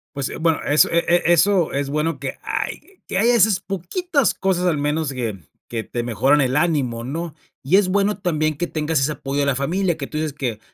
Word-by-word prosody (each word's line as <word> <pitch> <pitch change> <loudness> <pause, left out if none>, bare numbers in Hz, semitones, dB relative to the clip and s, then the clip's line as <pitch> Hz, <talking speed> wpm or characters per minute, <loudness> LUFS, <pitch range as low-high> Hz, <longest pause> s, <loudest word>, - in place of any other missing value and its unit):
Pues, 140 -2 -2
eh - - -6
bueno, 160 -1 +1
eso, 150 +1 +4
e 170 - +4 0.3
e 175 - +5
eso, 175 0 +3
es 140 0 -2
bueno 150 +3 -1
que - - -5
hay 390 -1 -5
que 190 - -3
haya, 235 +4 +4
esas 215 -4 +4
poquitas 250 - -1
cosas, 185 -2 0
al 170 -4 +2
menos 150 0 -1
que 115 -6 -4 0.3
que 115 -2 -4
te 120 - -4
mejoran 130 +5 +2
el 130 0 +1
ánimo, 135 -8 0
¿no? 160 +4 -4 0.3
Y 145 +9 +4
es 200 -2 +3
bueno 200 +2 +1
también 155 -5 0
que 175 +2 -2
tengas 155 -1 -1
ese 145 +3 +1
apoyo 140 0 -4
de 140 - +2
la 140 -2 +1
familia, 170 +6 0
que 145 -3 -5
tú 155 - -6
dices, 155 -2 -2
que 120 -6 -3
155 Hz, 225 wpm, -21 LUFS, 140-185 Hz, 0.3 s, e